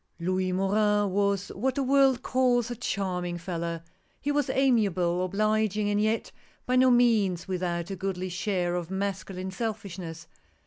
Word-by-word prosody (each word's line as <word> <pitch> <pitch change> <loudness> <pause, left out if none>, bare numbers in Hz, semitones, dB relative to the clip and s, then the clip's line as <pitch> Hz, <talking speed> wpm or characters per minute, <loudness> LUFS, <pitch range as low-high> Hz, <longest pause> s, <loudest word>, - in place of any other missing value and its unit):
L 170 +2 -2
OUIS 185 0 0
MORIN 205 +1 +2
was 200 0 0
what 255 +6 -1
the 275 - 0
world 270 -1 +3
calls 245 -2 +2
a - - -3
charm 195 -6 -2
ing 175 -1 -3
fellow. 170 -1 -4 0.4
He 290 - -1
was 290 -2 0
amiable, 195 -9 +2
obliging, 215 +1 +1
and 205 0 +1
yet 220 +1 0 0.3
by 250 - +1
no 255 0 +5
means 220 -8 +3
without 175 -1 -2
a - - -3
goodly 185 -1 -3
share 180 -1 -1
of 175 -1 -3
masculine 190 -1 -3
selfishness. 190 -6 -5
195 Hz, 160 wpm, -27 LUFS, 180-225 Hz, 0.4 s, no